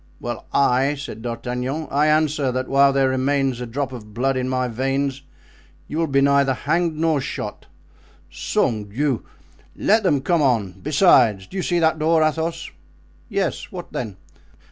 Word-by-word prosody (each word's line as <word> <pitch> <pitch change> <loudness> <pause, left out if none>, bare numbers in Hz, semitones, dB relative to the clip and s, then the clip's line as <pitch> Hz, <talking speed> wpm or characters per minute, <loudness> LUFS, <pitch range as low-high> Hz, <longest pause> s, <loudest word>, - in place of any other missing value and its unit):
"Well, 120 -2 -6
I," 135 +1 +2
said 140 -5 -8
D'Artagnan 125 +5 -4
"I 145 +2 +3
answer 150 -3 +2
that 130 0 -2
while 140 0 +4
there 135 -1 +2
remains 130 -1 0
a 125 - -4
drop 135 +3 -3
of 105 -4 -10
blood 135 +3 +1
in 130 0 -1
my 130 -1 0
veins 135 +3 -1 0.7
you 155 - -3
will 165 - +1
be 140 -1 +2
neither 140 -1 +3
hanged 170 +3 0
nor 160 -3 +1
shot. - - -6 0.6
Sang 110 -3 -1
Diou! 125 +4 -1 0.5
let 220 +2 +3
them 150 -9 +2
come 170 +2 +1
on! 115 -9 +1
Besides—do 140 - +3
you 190 - -1
see 175 -1 0
that 160 -1 +2
door, 160 +1 +3
Athos?" 160 +1 -2 0.6
"Yes; 200 -5 -2
what 180 -2 -8
then?" 105 -7 -4
140 Hz, 160 wpm, -22 LUFS, 125-155 Hz, 0.7 s, while